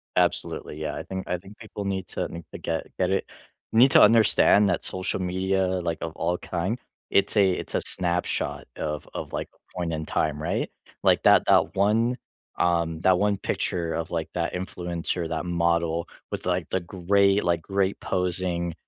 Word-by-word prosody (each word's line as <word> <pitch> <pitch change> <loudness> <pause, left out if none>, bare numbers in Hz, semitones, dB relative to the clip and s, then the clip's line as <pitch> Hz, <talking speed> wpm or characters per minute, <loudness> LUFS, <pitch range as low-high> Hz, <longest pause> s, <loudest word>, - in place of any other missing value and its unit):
Absolutely, 75 - 0
yeah. 75 -1 -3
I 80 - -5
think 95 +1 -6
I 90 - 0
think 100 +4 -14
people 105 -2 -7
need 95 -1 -2
to - - -2
need 85 0 -8
to - - -7
get 80 -1 -2
get 90 0 +2
it 95 - +1 0.5
need 125 +4 +6
to - - +7
understand 105 -1 +6
that 90 - 0
social 95 +1 -3
media, 95 +1 0 0.2
like, 85 -2 -2
of 85 - -3
all 90 +1 0
kind, 95 +8 -2 0.3
it's 100 +2 +2
a 95 -2 +5
it's - - -4
a - - +2
snapshot 90 -1 -2
of 75 -1 -3
of, - - -5
like, - - -3
a - - -20
point 85 -2 -1
in 80 0 -3
time, 75 -1 -1
right? 85 - -1 0.3
Like, - - +4
that - - +6
that - - +3
1, 115 +5 +2 0.4
um, 85 -2 +1
that 95 -1 +4
1 100 -1 +2
picture 85 -3 -2
of, 80 0 -3
like, 80 -2 -2
that 85 -1 -1
influencer, 90 -2 -3
that 80 +2 -2
model 85 -1 +1 0.2
with, - - -4
like, 90 -2 0
the 95 - +1
great, 100 +3 +2
like, 85 -1 +1
great 95 +2 0
posing, 90 -2 -1
90 Hz, 185 wpm, -26 LUFS, 85-95 Hz, 0.5 s, to